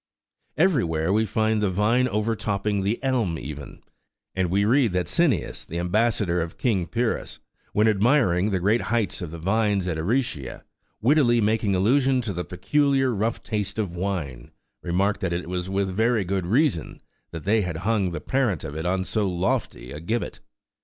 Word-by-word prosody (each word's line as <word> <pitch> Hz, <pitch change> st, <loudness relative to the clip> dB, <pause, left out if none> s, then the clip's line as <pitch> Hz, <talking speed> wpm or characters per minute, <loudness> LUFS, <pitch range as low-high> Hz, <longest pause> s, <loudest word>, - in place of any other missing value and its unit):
14 155 Hz, -, +4 dB
Everywhere 90 Hz, -, +1 dB
we 110 Hz, +1 st, +2 dB
find 110 Hz, +1 st, +1 dB
the 105 Hz, -, +2 dB
vine 110 Hz, +7 st, +2 dB
overtopping 105 Hz, -2 st, -1 dB
the 100 Hz, +4 st, 0 dB
elm 120 Hz, -11 st, 0 dB
even, 70 Hz, +1 st, -8 dB, 0.5 s
and 95 Hz, -2 st, 0 dB
we 100 Hz, +3 st, +2 dB
read 120 Hz, -2 st, +3 dB
that 90 Hz, -1 st, 0 dB
Cineas,14* 130 Hz, -, 0 dB
the 85 Hz, -, -5 dB
ambassador 90 Hz, -1 st, +1 dB
of 80 Hz, 0 st, -5 dB
King 100 Hz, -8 st, 0 dB
Pyrrhus, 120 Hz, 0 st, -2 dB, 0.4 s
when 105 Hz, +1 st, +3 dB
admiring 105 Hz, -3 st, +3 dB
the 95 Hz, -3 st, 0 dB
great 105 Hz, +6 st, +2 dB
height 115 Hz, -3 st, -1 dB
of 90 Hz, -, -4 dB
the 85 Hz, -, -7 dB
vines 100 Hz, +2 st, +1 dB
at 80 Hz, -3 st, -2 dB
Aricia, 90 Hz, -, -2 dB, 0.4 s
wittily 125 Hz, -2 st, +4 dB
making 105 Hz, -2 st, +1 dB
allusion 130 Hz, +7 st, +3 dB
to 110 Hz, -5 st, -4 dB
the 90 Hz, 0 st, -3 dB
peculiar 135 Hz, +6 st, +1 dB
rough 110 Hz, +2 st, -1 dB
taste 105 Hz, -2 st, -3 dB
of 100 Hz, -6 st, -2 dB
wine, 85 Hz, -10 st, -4 dB, 0.3 s
remarked 100 Hz, +4 st, 0 dB
that 95 Hz, -2 st, -1 dB
it 85 Hz, 0 st, -3 dB
was 90 Hz, 0 st, -3 dB
with 95 Hz, 0 st, 0 dB
very 110 Hz, 0 st, +2 dB
good 95 Hz, -1 st, -2 dB
reason 125 Hz, -, +1 dB, 0.3 s
that 80 Hz, -2 st, -7 dB
they 110 Hz, +2 st, +2 dB
had 90 Hz, -4 st, -3 dB
hung 105 Hz, -4 st, +1 dB
the 85 Hz, -, -4 dB
parent 120 Hz, -, 0 dB
of 75 Hz, -2 st, -6 dB
it 80 Hz, +2 st, -3 dB
on 95 Hz, +1 st, 0 dB
so 105 Hz, +1 st, -1 dB
lofty 85 Hz, -8 st, -2 dB
a 75 Hz, -, -6 dB
gibbet. 110 Hz, +9 st, -3 dB
100 Hz, 175 wpm, -24 LUFS, 90-115 Hz, 0.5 s, 14